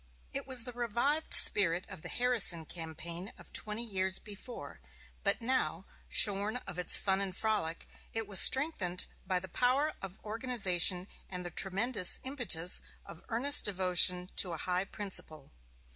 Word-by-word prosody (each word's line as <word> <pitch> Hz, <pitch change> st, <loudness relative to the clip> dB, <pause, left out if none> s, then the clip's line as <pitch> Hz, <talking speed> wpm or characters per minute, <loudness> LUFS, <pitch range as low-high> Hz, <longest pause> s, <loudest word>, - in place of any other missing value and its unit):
It -, -, -7 dB
was 255 Hz, -3 st, +2 dB
the 250 Hz, -, -7 dB
revived 245 Hz, +6 st, -3 dB
spirit 180 Hz, -3 st, +6 dB
of -, -, -13 dB
the -, -, -7 dB
Harrison 230 Hz, -10 st, +1 dB
campaign 170 Hz, +3 st, -9 dB
of -, -, -19 dB
twenty 215 Hz, +2 st, -4 dB
years 190 Hz, -4 st, 0 dB
before; 210 Hz, +4 st, -11 dB, 0.4 s
but 200 Hz, +3 st, -2 dB
now, 195 Hz, -8 st, -3 dB, 0.2 s
shorn 205 Hz, +2 st, +4 dB
of 180 Hz, -2 st, -9 dB
its 180 Hz, -, +7 dB
fun 195 Hz, 0 st, -2 dB
and 190 Hz, -2 st, -6 dB
frolic, 190 Hz, -7 st, -3 dB, 0.3 s
it 225 Hz, 0 st, -6 dB
was 200 Hz, -3 st, +3 dB
strengthened 235 Hz, -, +4 dB, 0.2 s
by 185 Hz, -1 st, -2 dB
the 190 Hz, -, -10 dB
power 260 Hz, -, -2 dB
of 195 Hz, -1 st, -10 dB
organization 195 Hz, -6 st, +1 dB, 0.2 s
and 180 Hz, -1 st, -8 dB
the 175 Hz, -, -7 dB
tremendous 195 Hz, +3 st, +1 dB
impetus 240 Hz, -, 0 dB, 0.2 s
of 165 Hz, -, -14 dB
earnest 270 Hz, +6 st, +2 dB
devotion 180 Hz, -1 st, +1 dB
to 180 Hz, -3 st, +1 dB
a -, -, -7 dB
high 180 Hz, +3 st, -4 dB
principle. 185 Hz, -8 st, -8 dB
195 Hz, 150 wpm, -29 LUFS, 180-235 Hz, 0.4 s, its